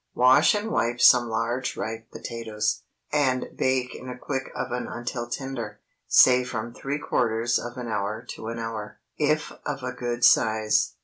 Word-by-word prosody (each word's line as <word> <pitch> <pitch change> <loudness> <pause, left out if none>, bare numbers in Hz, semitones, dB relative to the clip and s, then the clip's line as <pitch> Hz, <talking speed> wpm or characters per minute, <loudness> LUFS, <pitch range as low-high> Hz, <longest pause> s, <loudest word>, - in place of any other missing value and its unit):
Wash 125 - +6
and 210 +2 -2
wipe 120 - 0
some 120 -2 +6
large 115 +3 -2
ripe 110 +1 -5
potatoes, 110 -2 -3 0.3
and 130 -4 +1
bake 130 -1 0
in 130 - -9
a 125 - -6
quick 135 +1 -4
oven 125 -1 -3
until 120 0 -5
tender, 120 -5 -5 0.3
say 125 0 +6
from 120 -2 -5
three 140 +4 -3
quarters 115 -4 +1
of 120 +1 -7
an 125 -1 -5
hour 105 -1 -3
to 110 - -7
an 115 +1 -4
hour, 115 -2 -5 0.2
if 155 +1 +1
of 140 -3 -4
a 125 - -2
good 120 -1 0
size. 110 -2 +3
120 Hz, 165 wpm, -25 LUFS, 115-130 Hz, 0.3 s, Wash